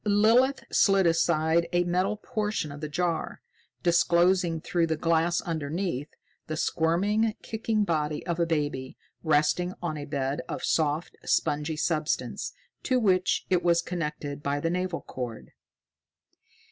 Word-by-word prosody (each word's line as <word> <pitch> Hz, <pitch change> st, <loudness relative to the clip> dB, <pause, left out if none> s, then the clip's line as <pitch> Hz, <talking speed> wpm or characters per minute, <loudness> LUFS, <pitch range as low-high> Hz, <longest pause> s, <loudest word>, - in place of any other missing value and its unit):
Lilith 230 Hz, +6 st, +4 dB
slid 195 Hz, -2 st, +4 dB
aside 165 Hz, 0 st, +2 dB
a 175 Hz, 0 st, +3 dB
metal 185 Hz, +4 st, 0 dB
portion 210 Hz, -, -2 dB
of 145 Hz, +1 st, -9 dB
the 155 Hz, -, -4 dB
jar, 170 Hz, +1 st, -2 dB, 0.4 s
disclosing 175 Hz, 0 st, +3 dB
through 170 Hz, 0 st, 0 dB
the 160 Hz, -1 st, -1 dB
glass 165 Hz, +1 st, +2 dB
underneath 160 Hz, -2 st, -3 dB, 0.4 s
the 155 Hz, -, -3 dB
squirming, 205 Hz, +8 st, +1 dB
kicking 220 Hz, -1 st, -1 dB
body 155 Hz, -5 st, -1 dB
of 170 Hz, -1 st, -2 dB
a 170 Hz, -, +2 dB
baby, 145 Hz, -5 st, -2 dB, 0.2 s
resting 160 Hz, +4 st, +1 dB
on 155 Hz, -3 st, -3 dB
a 145 Hz, -, -5 dB
bed 140 Hz, -1 st, -2 dB
of -, -, -4 dB
soft, 155 Hz, +1 st, 0 dB
spongy 150 Hz, +2 st, 0 dB
substance, 155 Hz, -1 st, -1 dB, 0.3 s
to 255 Hz, -2 st, +1 dB
which 185 Hz, -5 st, +2 dB
it 180 Hz, -2 st, +3 dB
was 170 Hz, -1 st, +3 dB
connected 150 Hz, -4 st, -4 dB
by 140 Hz, 0 st, -1 dB
the 165 Hz, +3 st, -1 dB
navel 180 Hz, -1 st, -2 dB
cord. 120 Hz, -4 st, -7 dB
170 Hz, 135 wpm, -27 LUFS, 155-185 Hz, 0.4 s, Lilith